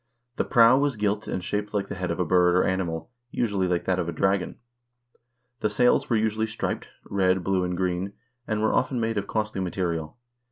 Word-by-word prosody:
The - - +2
prow 120 +2 +5
was 140 -2 +1
gilt 105 0 -1
and 90 - -3
shaped 105 +2 -3
like 100 -1 0
the - - -5
head 90 -2 -3
of 85 - -2
a 90 - +1
bird 90 +1 +4
or 90 - +4
animal; 90 -2 -2 0.2
usually 100 -7 0
like 90 -1 0
that 95 -1 +1
of 85 -1 -1
a - - -1
dragon. 95 +1 0 1.0
The 105 - +1
sails 125 +4 +3
were 115 - +2
usually 110 0 0
striped, 110 - -3 0.2
red, 95 -2 +1
blue, 95 -1 +1
and 90 0 -2
green, 90 +1 -1 0.3
and 110 -1 -1
were 110 - +2
often 130 -1 +1
made 115 -2 0
of 100 - -6
costly 105 -3 -2
material. 85 -2 -3
95 Hz, 205 wpm, -26 LUFS, 90-110 Hz, 1.0 s, prow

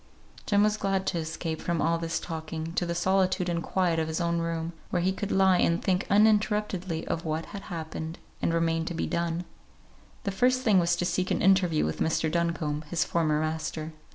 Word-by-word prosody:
Jem 205 0 +4
was 210 0 +2
glad 195 -2 0
to 175 - 0
escape 160 0 -4
from 170 -2 -1
all 165 +2 +1
this 165 -1 -2
talking 160 0 -5
to 175 - 0
the 170 - -2
solitude 185 +1 +2
and 170 -1 -1
quiet 170 -1 +1
of 160 - 0
his 160 +1 -2
own 170 -1 0
room, 165 0 -2 0.2
where 175 -1 0
he 190 - +2
could 205 +1 -4
lie 190 -1 +4
and 170 +1 +3
think 185 0 +1
uninterruptedly 210 -5 +2
of 165 - -2
what 160 0 -2
had 200 - -5
happened 160 -1 -5 0.2
and - - +1
remained 165 0 +1
to 170 - -3
be - - -1
done. 170 +1 -2 0.8
The 200 - -1
first 255 +6 +2
thing 210 -6 +5
was 170 0 +2
to 175 - -1
seek 185 +1 0
an - - 0
interview 185 -4 +4
with 80 - -3
Mr. 160 0 +1
Duncombe, 165 -3 -1
his 165 -3 +1
former 155 -3 +1
master. 155 0 -3
170 Hz, 205 wpm, -28 LUFS, 160-190 Hz, 0.8 s, thing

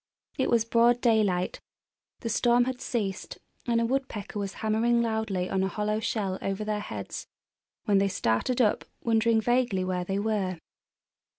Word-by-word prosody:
It 265 - 0
was 230 -2 +3
broad 235 +1 +4
daylight, 210 -7 +1 0.6
the 230 - -3
storm 240 +2 +3
had 255 0 -4
ceased, 200 -6 -3 0.3
and 235 -1 +2
a 230 - +2
woodpecker 235 -5 -3
was 200 -1 -3
hammering 235 +2 +2
loudly 220 -5 -1
on 190 0 0
a 190 - +1
hollow 210 +2 -1
shell 200 -4 -2
over 195 +2 -2
their 210 0 -1
heads - - -6 0.6
when 200 -2 +4
they 200 - +3
started 185 - 0
up, 215 -3 +2 0.2
wondering 225 0 +3
vaguely 240 -4 +1
where 180 -1 -1
they 195 +2 -2
were. 200 -4 -1
215 Hz, 160 wpm, -28 LUFS, 195-235 Hz, 0.6 s, broad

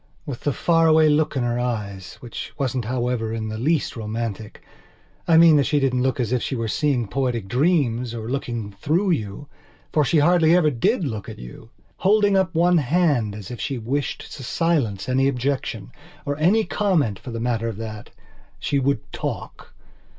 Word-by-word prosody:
With 135 -5 -5
the 145 - -1
far 165 +3 +2
away 155 -1 +5
look 150 0 +1
in 130 - 0
her 120 0 -1
eyeswhich 110 -1 -5
wasn't, 130 -3 -1
however, 120 -2 -1
in 110 -1 -3
the 110 0 -5
least 155 +4 0
romanticI 110 -1 -5 0.8
mean 165 -2 +7
that 140 - +3
she 150 - +2
didn't 130 -2 +1
look 130 0 0
as 120 -2 -1
if 125 -2 +1
she 135 - -2
were 115 -2 -2
seeing 125 -1 0
poetic 120 -2 -2
dreams, 125 - +1
or 110 -1 -5
looking 120 -5 -3
through 165 - 0
you, 110 - -3 0.5
for 150 - +4
she 155 - +2
hardly 165 +2 +5
ever 160 -4 +3
did 185 - +1
look 110 -7 -5
at - - -8
you!holding 195 - -1
up 190 -2 +1
one 175 +1 +4
hand 140 - +1
as 105 -1 -8
if 120 -4 -6
she 135 - -2
wished 135 +5 -3
to 140 - -9
silence 130 - 0
any 135 +2 +2
objectionor 125 -5 -3 0.5
any 195 +8 +4
comment 155 - 0
for - - -9
the 115 -1 -4
matter 115 -1 -1
of 110 -3 -4
thatshe 110 +5 -6
would 135 -4 +1
talk. - - -6
130 Hz, 170 wpm, -23 LUFS, 115-155 Hz, 0.8 s, mean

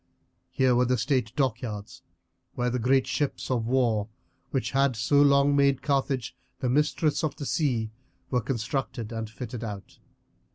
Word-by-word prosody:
Here 130 -1 +2
were 125 +1 +3
the 125 +1 +1
state 125 -1 0
dockyards 115 -6 -2 0.5
where 125 0 0
the 125 - -1
great 130 +3 +3
ships 145 -2 -2
of 115 -3 0
war, 115 -5 +2 0.4
which 135 - -1
had 135 -2 +2
so 140 +6 +3
long 140 0 +5
made 140 -1 +3
Carthage 135 -4 0 0.2
the 125 - -1
mistress 150 +3 +1
of 155 -3 -1
the 145 - -6
sea, 120 -8 0 0.4
were 125 -2 +2
constructed 115 0 -3
and 115 -1 -4
fitted 120 +1 -7
out. 105 -3 -7
125 Hz, 155 wpm, -27 LUFS, 115-140 Hz, 0.5 s, long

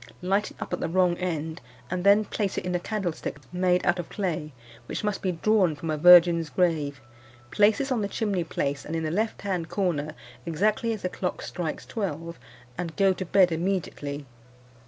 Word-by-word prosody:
Light 195 +3 +1
it - - -17
up - - -5
at 180 - -1
the - - -2
wrong 180 0 +3
end, 160 -2 -3 0.3
and 180 -1 -2
then 200 +2 +5
place 205 -1 -2
it - - -2
in 180 - -2
a 180 - +1
candlestick 175 -8 -3 0.2
made 180 0 +2
out 175 0 +2
of 175 - -5
clay, 170 -7 -3 0.4
which - - -4
must 210 -2 -1
be 185 -2 0
drawn 185 -2 +2
from 160 +2 -4
a 155 - -1
virgin's 170 -1 +7
grave. 155 -7 0 0.5
Place 210 +1 +4
this 275 -1 -2
on 240 -4 +1
the 200 - 0
chimney 200 -4 -1
place, 140 -3 -2
in 160 +1 -3
the 155 - -1
left 215 +5 -1
hand 180 -5 -2
corner, 160 -6 -1 0.3
exactly 210 +7 0
as 215 -3 -4
the 180 - 0
clock 180 0 -4
strikes 170 -4 -4
twelve, 170 -5 -4 0.4
and 170 -3 -4
go 195 -1 +4
to 185 - -4
bed 180 0 +4
immediately. 160 -5 -2
180 Hz, 195 wpm, -26 LUFS, 165-195 Hz, 0.5 s, virgin's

